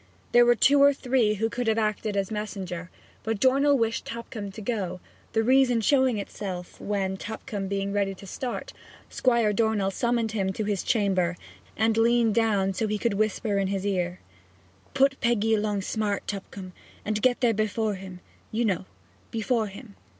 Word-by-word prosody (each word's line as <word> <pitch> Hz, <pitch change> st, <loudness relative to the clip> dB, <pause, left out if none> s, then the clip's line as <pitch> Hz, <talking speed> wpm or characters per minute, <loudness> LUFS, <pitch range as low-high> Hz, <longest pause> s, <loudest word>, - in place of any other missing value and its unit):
There 240 Hz, 0 st, +6 dB
were 240 Hz, -, +6 dB
two 280 Hz, +4 st, +5 dB
or 280 Hz, 0 st, +6 dB
three 245 Hz, -5 st, +1 dB
who 220 Hz, +2 st, 0 dB
could 245 Hz, +1 st, -3 dB
have 220 Hz, 0 st, +2 dB
acted 215 Hz, -1 st, -1 dB
as 195 Hz, +1 st, -1 dB
messenger, 190 Hz, -5 st, -5 dB, 0.3 s
but 225 Hz, -2 st, -2 dB
Dornell 275 Hz, +4 st, +4 dB
wished 230 Hz, -1 st, 0 dB
Tupcombe 225 Hz, -3 st, -6 dB
to 220 Hz, -, -9 dB
go, 200 Hz, -5 st, -3 dB, 0.3 s
the 225 Hz, -, +2 dB
reason 255 Hz, -1 st, +4 dB
showing 260 Hz, 0 st, +3 dB
itself 190 Hz, -3 st, -6 dB
when, 195 Hz, -2 st, -1 dB
Tupcombe 205 Hz, -2 st, -5 dB
being 200 Hz, 0 st, -2 dB
ready 200 Hz, -1 st, 0 dB
to 195 Hz, -, -12 dB
start, 245 Hz, +6 st, -5 dB, 0.4 s
Squire 235 Hz, -4 st, +2 dB
Dornell 210 Hz, -2 st, +1 dB
summoned 235 Hz, +1 st, 0 dB
him 195 Hz, -3 st, -1 dB
to 215 Hz, -, -3 dB
his 205 Hz, -2 st, -1 dB
chamber 185 Hz, -5 st, +1 dB, 0.4 s
and 220 Hz, 0 st, +2 dB
leaned 230 Hz, -1 st, +3 dB
down 205 Hz, -4 st, +2 dB
so 205 Hz, +4 st, -1 dB
that -, -, -4 dB
he -, -, 0 dB
could 230 Hz, +1 st, 0 dB
whisper 210 Hz, 0 st, 0 dB
in 195 Hz, -, +1 dB
his 195 Hz, 0 st, -2 dB
ear: 180 Hz, -2 st, -1 dB, 0.8 s
'Put 270 Hz, 0 st, +3 dB
Peggy 225 Hz, -2 st, +2 dB
along 210 Hz, -2 st, 0 dB
smart, 205 Hz, -1 st, -2 dB
Tupcombe, 195 Hz, -2 st, -7 dB, 0.3 s
and 210 Hz, 0 st, -1 dB
get 250 Hz, 0 st, +3 dB
there 240 Hz, -2 st, +4 dB
before 215 Hz, 0 st, 0 dB
him, 185 Hz, -2 st, -9 dB, 0.3 s
you 230 Hz, +2 st, 0 dB
know 190 Hz, -3 st, 0 dB, 0.4 s
before 225 Hz, 0 st, 0 dB
him. 195 Hz, -, -11 dB
215 Hz, 175 wpm, -26 LUFS, 195-235 Hz, 0.8 s, There